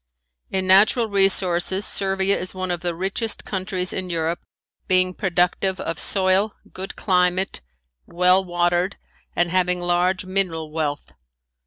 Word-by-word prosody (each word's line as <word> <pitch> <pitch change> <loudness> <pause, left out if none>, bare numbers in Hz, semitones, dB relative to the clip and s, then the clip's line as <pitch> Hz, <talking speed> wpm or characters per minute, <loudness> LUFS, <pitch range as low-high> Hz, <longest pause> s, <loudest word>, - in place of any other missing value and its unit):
In 190 -1 -1
natural 215 +5 +4
resources 190 -1 +2
Servia 195 0 +1
is 185 +1 -5
one 185 -1 -3
of 175 - -2
the 175 -1 -3
richest 195 +5 -3
countries 185 -1 -2
in 185 -1 -4
Europe, 165 0 -1 0.5
being 185 0 +2
productive 185 0 0
of 165 - -4
soil, 195 +2 +2 0.2
good 190 +1 -6
climate, 180 - 0 0.5
well 180 +2 +3
watered 175 +1 0 0.4
and 175 -1 +1
having 180 -1 +1
large 175 +1 0
mineral 180 -5 -2
wealth. 150 -2 -3
185 Hz, 130 wpm, -22 LUFS, 175-190 Hz, 0.5 s, natural